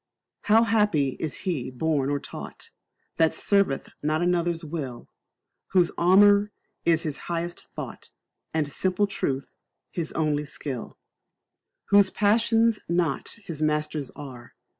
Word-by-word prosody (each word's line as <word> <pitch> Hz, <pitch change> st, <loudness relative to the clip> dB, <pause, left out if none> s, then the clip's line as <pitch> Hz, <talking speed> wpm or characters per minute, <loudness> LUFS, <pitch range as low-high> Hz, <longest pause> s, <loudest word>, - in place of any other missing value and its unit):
How 225 Hz, +2 st, +6 dB
happy 210 Hz, -11 st, +2 dB
is 155 Hz, -4 st, -4 dB
he 165 Hz, -10 st, -1 dB
born 140 Hz, +1 st, 0 dB
or 145 Hz, 0 st, 0 dB
taught, -, -, -9 dB, 0.5 s
That 160 Hz, -1 st, +3 dB
serveth 200 Hz, -9 st, +1 dB
not 155 Hz, +3 st, 0 dB
another's 175 Hz, -1 st, 0 dB
will, 145 Hz, -6 st, -5 dB, 0.7 s
Whose 180 Hz, -2 st, +4 dB
armour 205 Hz, +3 st, +5 dB, 0.3 s
is 165 Hz, -1 st, +3 dB
his 150 Hz, -3 st, -3 dB
honest 170 Hz, 0 st, -3 dB
thought, -, -, -7 dB, 0.4 s
And 155 Hz, -2 st, 0 dB
simple 185 Hz, +7 st, 0 dB
truth 140 Hz, -9 st, -3 dB, 0.3 s
his 165 Hz, -3 st, -3 dB
only 150 Hz, -2 st, 0 dB
skill: 135 Hz, -4 st, -5 dB, 0.9 s
Whose 200 Hz, -1 st, +6 dB
passions 225 Hz, +2 st, +3 dB
not 170 Hz, -4 st, 0 dB
his 160 Hz, -5 st, -6 dB
masters 150 Hz, -2 st, 0 dB
are. 130 Hz, -5 st, -10 dB
165 Hz, 120 wpm, -26 LUFS, 145-195 Hz, 0.9 s, How